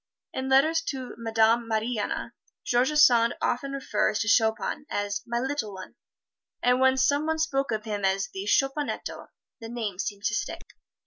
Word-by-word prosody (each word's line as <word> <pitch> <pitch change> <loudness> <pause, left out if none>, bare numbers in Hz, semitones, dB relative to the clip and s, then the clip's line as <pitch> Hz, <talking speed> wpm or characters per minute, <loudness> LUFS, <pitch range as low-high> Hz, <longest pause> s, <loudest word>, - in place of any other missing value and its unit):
In 260 0 -3
letters 310 +5 +4
to 260 -3 -4
Madame 225 0 +2
Mariana, 220 0 -2 0.3
George 245 +4 +2
Sand 240 -6 +5
often 275 +3 -1
refers 215 -6 0
to 225 - -2
Chopin 225 +6 +1
as 205 -1 -2
"My 235 0 -1
Little 245 -6 -3
One," 185 0 -10 0.7
and 250 +1 +3
when 260 0 +4
some 285 +3 +2
one 320 0 0
spoke 275 -5 0
of 215 -1 -2
him 205 -2 -3
as 195 0 +1
"The 195 +1 -5
Chopinetto," 270 +6 -1 0.3
the 225 - -8
name 220 -6 -4
seemed 200 -1 -4
to 220 +2 0
stick. 415 - -3
235 Hz, 165 wpm, -27 LUFS, 215-270 Hz, 0.7 s, Sand